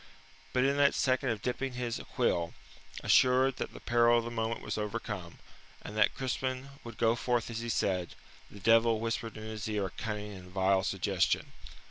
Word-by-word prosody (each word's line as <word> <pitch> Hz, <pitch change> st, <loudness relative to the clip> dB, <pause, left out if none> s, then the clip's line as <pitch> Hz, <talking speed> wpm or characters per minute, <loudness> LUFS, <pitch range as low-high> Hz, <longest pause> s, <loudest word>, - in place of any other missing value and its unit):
But 125 Hz, -, +2 dB
in 140 Hz, +1 st, +2 dB
that 140 Hz, -1 st, +4 dB
second 130 Hz, 0 st, +1 dB
of 110 Hz, -3 st, -2 dB
dipping 130 Hz, +1 st, -2 dB
his 125 Hz, -2 st, -3 dB
quill, 85 Hz, -1 st, +1 dB, 0.5 s
assured 130 Hz, +1 st, +4 dB
that -, -, -4 dB
the -, -, -10 dB
peril 120 Hz, 0 st, +4 dB
of 115 Hz, -, 0 dB
the 120 Hz, -, -4 dB
moment 115 Hz, 0 st, -2 dB
was -, -, -3 dB
overcome, 105 Hz, -5 st, -4 dB, 0.5 s
and 105 Hz, -, -7 dB
that 110 Hz, -2 st, +3 dB
Crispin 130 Hz, 0 st, -2 dB
would 115 Hz, -2 st, -9 dB
go 115 Hz, 0 st, +3 dB
forth 120 Hz, 0 st, -1 dB
as 115 Hz, -, -3 dB
he 120 Hz, 0 st, -4 dB
said, 90 Hz, -5 st, 0 dB, 0.3 s
the 100 Hz, -, -12 dB
devil 115 Hz, +2 st, +4 dB
whispered 115 Hz, 0 st, -3 dB
in 110 Hz, -, -7 dB
his 110 Hz, 0 st, -5 dB
ear 105 Hz, -2 st, 0 dB
a 95 Hz, -, -5 dB
cunning 105 Hz, -1 st, -5 dB
and 90 Hz, -1 st, -11 dB
vile 95 Hz, +1 st, +2 dB
suggestion. 95 Hz, -1 st, 0 dB
115 Hz, 185 wpm, -31 LUFS, 105-125 Hz, 0.5 s, that